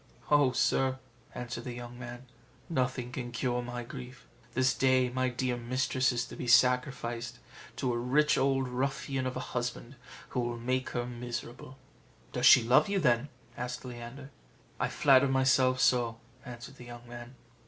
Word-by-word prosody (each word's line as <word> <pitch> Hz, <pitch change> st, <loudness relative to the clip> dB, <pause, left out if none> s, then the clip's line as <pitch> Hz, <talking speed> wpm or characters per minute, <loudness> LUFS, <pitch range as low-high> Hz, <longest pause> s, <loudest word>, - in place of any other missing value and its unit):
"Oh, 145 Hz, -3 st, +5 dB
sir," 130 Hz, +1 st, +1 dB, 0.4 s
answered 120 Hz, -1 st, -5 dB
the 125 Hz, -, -5 dB
young 120 Hz, 0 st, -8 dB
man, 120 Hz, +1 st, -8 dB, 0.5 s
"nothing 125 Hz, -3 st, -1 dB
can 125 Hz, -1 st, -5 dB
cure 125 Hz, +1 st, -1 dB
my 120 Hz, 0 st, -5 dB
grief; 125 Hz, +1 st, -10 dB, 0.3 s
this 130 Hz, 0 st, +3 dB
day 130 Hz, -1 st, +3 dB
my 130 Hz, 0 st, 0 dB
dear 125 Hz, 0 st, -1 dB
mistress 130 Hz, +2 st, 0 dB
is 120 Hz, -1 st, -1 dB
to -, -, -10 dB
be 125 Hz, -, -5 dB
sacrificed 120 Hz, -1 st, +2 dB, 0.4 s
to 125 Hz, -2 st, -1 dB
a -, -, -1 dB
rich 145 Hz, +5 st, +3 dB
old 135 Hz, -1 st, +1 dB
ruffian 135 Hz, +1 st, -2 dB
of 130 Hz, -, -4 dB
a -, -, -6 dB
husband 120 Hz, +1 st, -3 dB, 0.3 s
who -, -, -2 dB
will 120 Hz, -1 st, -2 dB
make 130 Hz, +2 st, -1 dB
her 120 Hz, -, -1 dB
miserable." 120 Hz, +1 st, -7 dB, 0.6 s
"Does 125 Hz, 0 st, +3 dB
she 125 Hz, -, +9 dB
love 125 Hz, -, +4 dB
you 200 Hz, -, +1 dB
then?" 125 Hz, -5 st, +2 dB, 0.3 s
asked 125 Hz, +2 st, -5 dB
Leander. 125 Hz, +3 st, -8 dB, 0.5 s
"I -, -, +1 dB
flatter 135 Hz, -1 st, +5 dB
myself 130 Hz, -1 st, +3 dB
so," 120 Hz, -3 st, +2 dB, 0.3 s
answered 125 Hz, +1 st, -10 dB
the 125 Hz, -, -11 dB
young 120 Hz, 0 st, -11 dB
man. 120 Hz, +1 st, -10 dB
125 Hz, 165 wpm, -30 LUFS, 120-130 Hz, 0.6 s, she